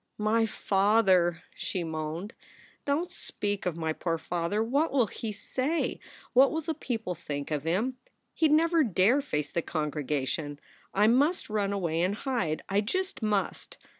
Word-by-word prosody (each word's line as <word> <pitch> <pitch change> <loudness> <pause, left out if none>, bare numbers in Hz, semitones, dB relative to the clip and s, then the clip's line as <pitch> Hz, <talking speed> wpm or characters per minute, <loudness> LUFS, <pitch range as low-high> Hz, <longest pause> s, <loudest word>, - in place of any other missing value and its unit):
"My 225 +2 +2
father!" 195 -5 +3
she 180 - -3
moaned. 160 +5 -4 0.5
"Don 290 +5 +1
t - - -19
speak 205 -2 -3
of 170 -2 -2
my 160 -1 -1
poor 165 0 -1
father. 175 +5 -1
What 280 +8 +1
will 260 -4 +4
he 220 +1 -5
say? 260 +9 -1 0.3
What 265 +2 +7
will 320 - -1
the 320 +1 -2
people 225 -11 -3
think 145 -3 -5
of 150 -1 -1
him? 220 +10 0 0.4
He 320 - +3
d 300 - +3
never 330 0 +4
dare 225 +4 +3
face 150 - -2
the 170 - 0
congregation. 145 -2 -2 0.3
I 205 +2 +3
must 275 +5 +3
run 205 -2 0
away 170 -5 0
and 185 +3 +1
hide. 230 - -1
I 200 +1 +2
just 375 - -2
must. 210 -2 -1
205 Hz, 165 wpm, -29 LUFS, 165-255 Hz, 0.5 s, What